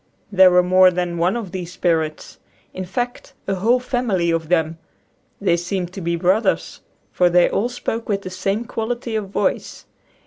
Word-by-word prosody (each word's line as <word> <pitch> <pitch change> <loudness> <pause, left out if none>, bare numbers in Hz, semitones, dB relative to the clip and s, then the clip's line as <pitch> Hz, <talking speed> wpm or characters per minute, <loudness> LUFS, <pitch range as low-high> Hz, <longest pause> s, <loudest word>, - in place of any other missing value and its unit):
There 190 -2 +7
were 180 0 +4
more 185 +1 +6
than 175 -1 -2
one 180 +5 +2
of 220 -7 -5
these 180 -1 -5
spirits; 160 -4 -1 0.3
in 185 - -5
fact, 245 +7 -4
a 195 - 0
whole 225 +7 +2
family 235 -9 0
of 165 -1 -2
them. 165 -2 +1 0.6
They 185 -4 +2
seemed 180 +1 -3
to 195 - -6
be 170 0 -1
brothers, 185 +6 0 0.3
for 180 -1 +3
they 175 0 +5
all 230 +5 0
spoke 230 -2 -4
with 200 -1 -1
the 185 - -6
same 195 +5 -2
quality 235 0 -3
of 210 -3 -3
voice. - - -2
185 Hz, 175 wpm, -21 LUFS, 175-220 Hz, 0.6 s, There